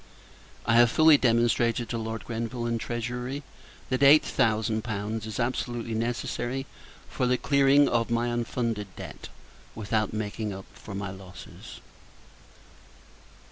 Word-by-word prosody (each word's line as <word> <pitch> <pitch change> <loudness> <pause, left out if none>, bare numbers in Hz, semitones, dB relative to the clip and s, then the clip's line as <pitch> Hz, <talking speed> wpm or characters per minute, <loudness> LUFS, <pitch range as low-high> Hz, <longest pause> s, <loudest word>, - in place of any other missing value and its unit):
I 115 +1 +3
have 120 0 +7
fully 155 +3 +6
demonstrated, 120 -1 +2
to 120 - -2
Lord 110 0 -5
Grenville 115 +1 -4
and 115 0 -1
Treasury, 125 +4 -4 0.5
that 130 0 0
eight 140 +2 +8
thousand 110 -3 +1
pounds 110 0 -4
is 110 +1 -5
absolutely 120 -1 -2
necessary 120 +3 -2 0.4
for 125 - -1
the 125 0 +2
clearing 140 +1 +4
off 115 -1 +1
my 120 +1 +1
unfunded 115 -3 -2
debt, - - -9 0.5
without 110 0 -1
making 105 0 -3
up 95 0 -8
for 100 - -9
my 100 -1 -4
losses. 95 -2 -11
115 Hz, 130 wpm, -27 LUFS, 110-125 Hz, 0.5 s, eight